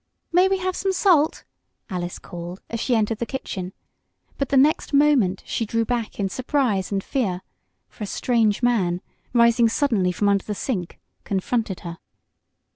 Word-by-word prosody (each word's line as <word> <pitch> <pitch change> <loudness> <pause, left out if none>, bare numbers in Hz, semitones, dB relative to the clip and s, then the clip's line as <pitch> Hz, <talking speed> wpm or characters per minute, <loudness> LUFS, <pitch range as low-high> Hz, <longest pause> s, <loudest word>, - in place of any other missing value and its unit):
"May 360 +2 +5
we 385 0 +1
have 370 0 -2
some 385 -1 0
salt?" 345 -5 +3 0.4
Alice 175 -1 -4
called, 175 +2 -8
as 230 - -2
she 245 +1 +1
entered 220 0 0
the 235 - -1
kitchen, 190 -9 -5 0.7
but 275 - -1
the 275 - +3
next 290 +1 +3
moment 275 -11 +3
she - - -2
drew 230 +1 0
back 235 -2 -3
in 200 - +1
surprise 245 -3 0
and 195 -1 -1
fear, 190 -9 -1 0.4
for - - -9
a - - -3
strange 225 0 +1
man, 185 -8 +2 0.3
rising 235 -1 +4
suddenly 220 -8 +1
from 205 +3 0
under 200 -1 +3
the 210 - -3
sink, 190 -7 -3 0.3
confronted 200 0 -1
her. 170 -1 -7
225 Hz, 165 wpm, -23 LUFS, 190-265 Hz, 0.7 s, May